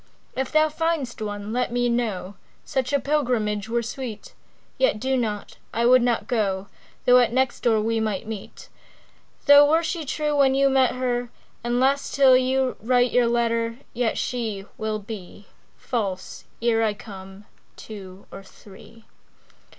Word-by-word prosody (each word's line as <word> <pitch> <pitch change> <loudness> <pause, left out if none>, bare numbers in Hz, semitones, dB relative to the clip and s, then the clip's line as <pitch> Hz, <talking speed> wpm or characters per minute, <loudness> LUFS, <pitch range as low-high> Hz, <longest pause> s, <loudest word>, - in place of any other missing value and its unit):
If 265 -1 -2
thou 310 0 +4
find'st 310 -6 -2
one 205 0 -4
let 250 -1 0
me 245 0 +1
know; 220 -6 -2 0.3
Such 265 -2 -2
a 285 - +2
pilgrimage 235 -8 0
were 235 +1 0
sweet. 235 -1 -7 0.5
Yet - - +2
do 265 +3 0
not; 215 -5 -3 0.2
I 235 +1 +1
would 255 +1 +6
not 240 -1 +1
go, 200 -6 -1 0.4
Though 250 0 +7
at 240 -2 +3
next 260 0 0
door 225 -3 +2
we 225 +1 0
might 215 -3 -2
meet. 215 -3 -8 0.8
Though 290 +2 +7
she 335 +1 -2
were 315 - -5
true 300 +1 -1
when 270 -2 +4
you 275 0 +4
met 260 -2 +3
her, 245 -1 -1 0.3
And 240 +1 0
last, 275 +2 +1
till 265 -2 +6
you 260 0 +1
write 245 +2 +2
your 245 -1 +3
letter, 230 -1 0 0.2
Yet 240 -1 0
she 220 -6 -3
Will 220 0 -2
be 205 -2 -9 0.3
False, 195 -6 -4 0.2
ere 230 -1 +3
I 215 -2 +1
come, 195 -1 -11 0.3
to - - -12
two 195 -3 -10
or - - -9
three. 205 +3 -16
240 Hz, 160 wpm, -24 LUFS, 215-260 Hz, 0.8 s, Though